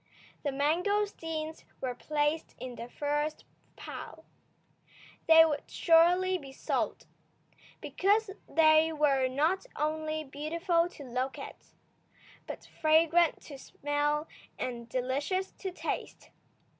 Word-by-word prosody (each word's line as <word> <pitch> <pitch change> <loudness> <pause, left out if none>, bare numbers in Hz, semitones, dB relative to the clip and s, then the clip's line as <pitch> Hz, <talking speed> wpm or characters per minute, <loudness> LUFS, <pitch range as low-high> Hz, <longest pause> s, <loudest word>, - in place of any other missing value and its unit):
The 290 - -1
mangosteens 325 +1 -1 0.2
were 255 -2 -2
placed 295 +4 -1
in 255 -1 -6
the 235 0 -8
first 295 +3 -2 0.3
pile. - - -9 1.0
They 325 0 +9
would 295 -3 -2
surely 360 +2 +4
be 275 -3 -10
sold, 270 - -2 0.8
because 410 +2 +1 0.2
they 315 0 +5
were 285 -4 +2
not 315 - 0
only 310 +1 -1
beautiful 335 +5 0
to 300 - -11
look 255 +1 -3
at, - - -11 0.7
but - - -7 0.2
fragrant 325 +1 +4
to 280 -3 -10
smell 290 +2 -1 0.3
and 235 -2 -5
delicious 275 - -1
to 385 - -3
taste. - - -5
310 Hz, 105 wpm, -30 LUFS, 285-335 Hz, 1.0 s, They